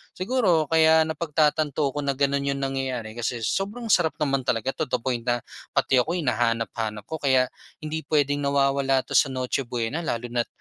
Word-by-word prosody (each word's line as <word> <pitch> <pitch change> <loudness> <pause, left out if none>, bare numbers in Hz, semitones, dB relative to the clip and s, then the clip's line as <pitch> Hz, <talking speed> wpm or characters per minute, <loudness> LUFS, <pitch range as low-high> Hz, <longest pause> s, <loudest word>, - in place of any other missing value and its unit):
siguro 185 -5 +2
kaya 160 0 +6
napagtatanto 155 -2 +1
ko 150 - -9
na 140 - +1
gano'n 140 0 0
yung 140 - -5
nangyayari 130 -4 -3
kasi 120 0 -2
sobrang 210 - -2
sarap 175 -6 +3
naman 135 -3 0
talaga 125 0 0
to - - -3
the 125 - -1
point 120 -2 -2
na 120 0 +1 0.3
pati 130 - +3
ako 155 +7 0
hinahanap-hanap 115 -6 -1
ko. 160 - -3
Kaya, 130 -3 +2 0.3
hindi 155 +1 -4
puwedeng 145 -1 +1
nawawala 140 -1 +2
'to - - 0
sa - - +5
Noche 130 +1 -2
Buena 120 +5 -2
lalo 120 -3 -3
na't, 120 0 -1
140 Hz, 175 wpm, -25 LUFS, 125-155 Hz, 0.3 s, kaya